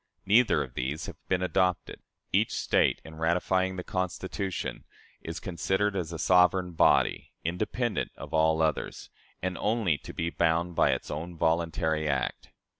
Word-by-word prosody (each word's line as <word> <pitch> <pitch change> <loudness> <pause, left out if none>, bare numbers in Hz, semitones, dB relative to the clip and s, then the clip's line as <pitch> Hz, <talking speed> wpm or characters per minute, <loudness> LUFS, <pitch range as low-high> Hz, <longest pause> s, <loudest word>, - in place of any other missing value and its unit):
Neither 110 +5 +4
of - - -11
these 65 +5 -3
has - - -7
been 90 -1 +1
adopted. 90 -1 0 0.3
Each - - +2
State, - - +2
in 80 0 -10
ratifying 95 +3 +1
the 90 - -5
Constitution, 95 +1 -3 0.4
is 85 +1 -5
considered 95 +3 -1
as 85 -4 -2
a 85 - -4
sovereign 90 +1 +4
body, 80 - +2
independent 105 +7 -1
of - - -9
all 80 0 +3
others, 80 -1 -2 0.3
and 90 -1 -2
only 105 - +1
to - - -9
be 85 +1 -2
bound 85 +1 +1
by - - +3
its - - -1
own 85 +3 -5
voluntary 80 -1 +1
act." 70 -2 -2
85 Hz, 150 wpm, -28 LUFS, 80-95 Hz, 0.4 s, Neither